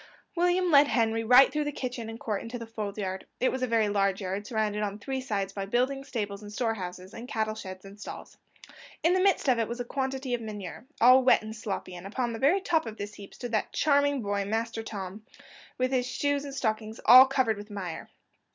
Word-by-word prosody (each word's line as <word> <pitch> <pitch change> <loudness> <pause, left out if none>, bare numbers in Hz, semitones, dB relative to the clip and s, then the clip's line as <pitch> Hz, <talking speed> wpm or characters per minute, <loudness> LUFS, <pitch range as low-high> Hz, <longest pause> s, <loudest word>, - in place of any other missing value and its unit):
William 355 +1 +2
led 285 -1 +7
Henry 225 -3 +1
right 250 +4 +7
through 300 0 0
the 295 - -1
kitchen 245 -4 -5
and 225 0 -8
court 210 -3 -2
into 230 +2 -6
the 230 - -7
fold 215 -3 -5
yard: 190 -2 -4
it 255 - +2
was 260 - -4
a 255 - +1
very 225 -2 +2
large 195 -1 +1
yard, 195 +1 -4
surrounded 215 -2 -1
on 205 -1 -2
three 265 +5 -4
sides 200 -6 -2
by 195 - -4
buildings, 265 +5 0
stables, 205 -3 -4
and 205 0 -9
store 225 +1 0
houses, 185 -1 -7
and 235 +2 -8
cattle 220 -3 -1
sheds 185 -3 -9
and 200 +1 -12
stalls. - - -9 0.7
In 335 +2 +4
the 370 - +3
midst 390 -5 +2
of 250 -3 +3
it 225 - 0
was 240 +1 -5
a 245 - -3
quantity 265 0 -3
of 240 - -1
manure, 210 +1 -7
all 255 +2 +7
wet 250 - +5
and 220 0 -7
sloppy, 200 -4 -5
and 180 +2 -8
upon 240 +3 -2
the 225 - -5
very 325 +9 +3
top 325 -6 +1
of 220 0 -7
this 205 +1 -6
heap 200 -1 -12
stood 245 -2 -6
that 215 - -1
charming 285 -3 +2
boy, 200 0 -1
Master 225 +2 -2
Tom, 205 -1 -7 0.5
with 255 +1 0
his 250 -2 +1
shoes 285 +2 -1
and 275 -1 -7
stockings 220 -3 -2
all 255 +2 +10
covered 260 -5 +1
with 205 +1 -9
mire. 185 -5 -6
225 Hz, 230 wpm, -28 LUFS, 205-260 Hz, 0.7 s, all